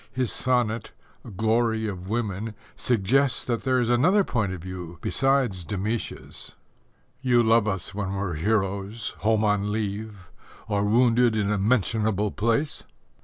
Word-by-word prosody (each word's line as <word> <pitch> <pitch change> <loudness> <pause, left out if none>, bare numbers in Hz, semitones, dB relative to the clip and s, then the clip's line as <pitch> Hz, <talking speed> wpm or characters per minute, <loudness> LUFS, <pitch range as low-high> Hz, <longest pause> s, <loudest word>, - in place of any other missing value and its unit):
His 130 -2 -1
sonnet, 120 -3 0 0.4
Glory 110 +1 +1
of 95 -3 -5
Women, 110 -1 -2 0.2
suggests 125 +4 +1
that 120 -2 -1
there 130 -1 +3
is 120 -1 +1
another 180 +12 +4
point 110 - -1
of 90 -3 -7
view 90 -2 -7
besides 130 -8 +1
Demætia's: 105 +6 -5 0.7
You 120 -3 +3
love 115 -1 +4
us 95 -1 -2
when 100 -1 -3
we're 95 -2 -2
heroes, 100 +4 -1
home 110 0 +2
on 105 -1 +1
leave, 105 -2 -4 0.4
Or 105 -1 0
wounded 120 +1 +3
in 105 -1 0
a 105 - 0
mentionable 105 -1 +1
place. 115 +7 0
110 Hz, 135 wpm, -25 LUFS, 100-120 Hz, 0.7 s, another